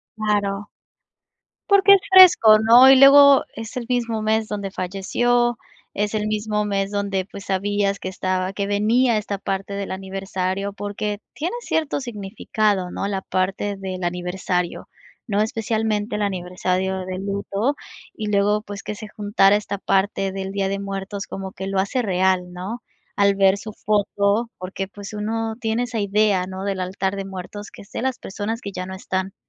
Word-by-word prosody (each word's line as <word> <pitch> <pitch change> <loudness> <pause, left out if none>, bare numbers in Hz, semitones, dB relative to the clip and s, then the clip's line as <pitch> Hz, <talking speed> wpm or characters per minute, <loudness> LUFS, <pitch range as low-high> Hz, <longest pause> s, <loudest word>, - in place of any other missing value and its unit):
Claro. 205 -2 -1 1.0
Porque 400 0 +7
es 395 - +5
fresco, 360 - +8
¿no? 235 +4 +8
Y 270 - +9
luego 280 0 +8
es 225 0 -7
el 245 - -4
mismo 235 -3 -1
mes 220 0 +1
donde 200 -2 -4
falleció, 240 +6 0 0.4
es 210 +1 -1
el 215 -1 -1
mismo 210 0 -1
mes 195 -1 -1
donde, 200 -2 -1
pues, 200 0 -10
sabías 200 +1 0
que 185 - -4
estaba 185 0 -2
que 200 0 -2
venía 220 +4 +2
esta 205 -1 -3
parte 195 +1 -4
del 200 0 -4
aniversario 190 0 -3
porque 205 +1 -4
tiene 340 +9 -3
cierto 315 -9 -1
significado, 205 -4 -2
¿no?, 195 - -3
la 195 -1 -2
parte 190 +2 -1
del 185 -1 -5
aniversario, 180 0 -2 0.4
¿no?, 205 -2 +1
especialmente 220 -1 -1
el 210 - -2
aniversario 185 0 -2
de 185 0 -5
luto 200 +6 -2 0.4
y 215 - -5
luego, 205 +1 +2
pues, 205 -2 -8
que 210 - -5
se 215 - -8
juntara 205 -2 +3
esta 205 -1 -3
parte 195 0 0
del 190 0 -5
Día 195 -1 -1
de 195 0 -2
Muertos 195 0 -5
como 195 0 -6
que 190 0 -6
lo 195 -1 -1
hace 200 +7 0
real, 185 -3 +1
¿no? 195 +7 -6 0.4
Al 200 -1 +4
ver 195 0 +4
su 215 +2 -8
foto 205 +2 0
porque, 190 +1 -5
pues, 200 +1 -10
uno 220 +1 -2
tiene 225 +1 -1
esa 240 -2 -3
idea, 200 -2 +2
¿no? 190 0 -6
Del 195 -1 -2
altar 190 +1 -2
de 195 - -4
muertos 195 +2 -8
que - - -12
es 200 - -22
de - - -4
las 260 0 -1
personas 215 +4 -4
que 200 - -6
ya 185 0 -4
no 190 - -7
están, 190 0 -3
200 Hz, 175 wpm, -22 LUFS, 190-215 Hz, 1.0 s, Y